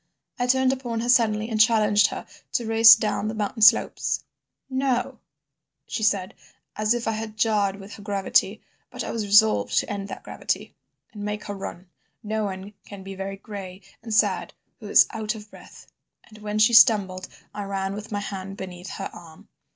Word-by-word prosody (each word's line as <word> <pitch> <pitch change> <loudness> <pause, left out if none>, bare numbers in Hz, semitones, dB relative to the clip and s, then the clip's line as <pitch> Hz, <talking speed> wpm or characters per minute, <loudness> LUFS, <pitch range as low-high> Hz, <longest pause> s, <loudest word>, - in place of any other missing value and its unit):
I 245 - 0
turned 260 +1 +3
upon 240 -4 -4
her 240 - -3
suddenly 220 -3 +3
and 220 -2 +1
challenged 215 -2 +4
her - - -7 0.3
to 235 - 0
race 225 +1 +8
down 215 -1 -2
the 220 - -4
mountain 215 +1 -3
slopes. 215 - +4 0.4
'No,' 260 -1 -1 0.7
she - - -5
said, 200 -3 +1 0.4
as 215 +2 +1
if 240 -1 -4
I - - +2
had 220 0 -6
jarred 210 -3 +1
with 200 +1 -11
her 205 - -11
gravity, 200 -2 0 0.3
but - - -6
I - - -4
was 220 -3 -3
resolved 215 +2 +4
to - - +2
end 200 -1 -5
that - - -8
gravity, - - -4 0.4
and 210 - -9
make 210 0 -4
her 205 - -6
run—no 200 +3 -7
one 195 +1 -6
can 200 -2 -11
be 195 0 -8
very 195 +1 -6
gray 195 -2 -9 0.2
and 225 -1 -9
sad 215 - +1 0.2
who - - -9
is - - +6
out 220 0 -3
of 210 -1 -12
breath—and 215 -1 -18
when 210 0 -4
she 215 +2 +4
stumbled 205 -5 +5 0.3
I 205 -1 -5
ran 195 0 -3
with 210 +2 -8
my 205 -1 -2
hand 195 -1 -6
beneath 180 -1 -8
her - - -6
arm. 160 -2 -14
210 Hz, 180 wpm, -24 LUFS, 195-225 Hz, 0.7 s, race